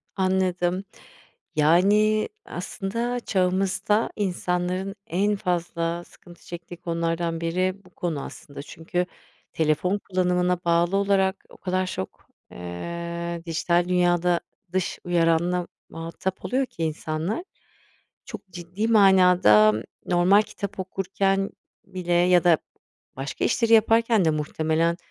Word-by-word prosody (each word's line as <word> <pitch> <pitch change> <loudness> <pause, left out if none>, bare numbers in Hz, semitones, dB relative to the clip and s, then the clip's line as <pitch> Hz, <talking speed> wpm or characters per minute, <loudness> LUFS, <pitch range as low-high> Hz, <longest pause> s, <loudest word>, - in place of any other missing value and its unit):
Anladım. 185 -1 0 0.7
Yani, 200 +8 +4 0.2
aslında 230 +7 -3
çağımızda 195 +1 +1
insanların 185 0 -2
en 200 +4 +1
fazla 175 -3 -2
sıkıntı 175 0 -18
çektiği 175 0 -8
konulardan 165 -1 -2
biri 185 +3 0
bu - - -17
konu 165 -5 -3
aslında. 140 0 -9
Çünkü 170 +4 -3 0.5
telefon 160 +5 +1
kullanımına 180 -2 0
bağlı 170 +3 +2
olarak 195 -1 +1
o - - -16
kadar 185 0 -1
çok, 95 - -6 0.2
eee, 170 - -5
dijital 170 +1 +1
dünyada 175 -1 +2 0.3
dış 185 -1 -1
uyaranla 175 0 +1 0.2
muhatap 165 +3 -5
oluyor 265 +2 +1
ki 170 - -6
insanlar, 160 - -2 0.8
çok 195 - -9
ciddi 180 +5 -4
manada 180 - +6 0.3
normal 180 +3 +4
kitap 205 -1 -7
okurken 195 +1 0 0.4
bile 180 -2 -3
ya 175 0 +4
da 170 -2 +5 0.6
başka 135 +1 -3
işleri 230 -1 +2
yaparken 225 -2 +4
de - - +4
muhtemelen 155 +2 0
180 Hz, 110 wpm, -25 LUFS, 170-195 Hz, 0.8 s, manada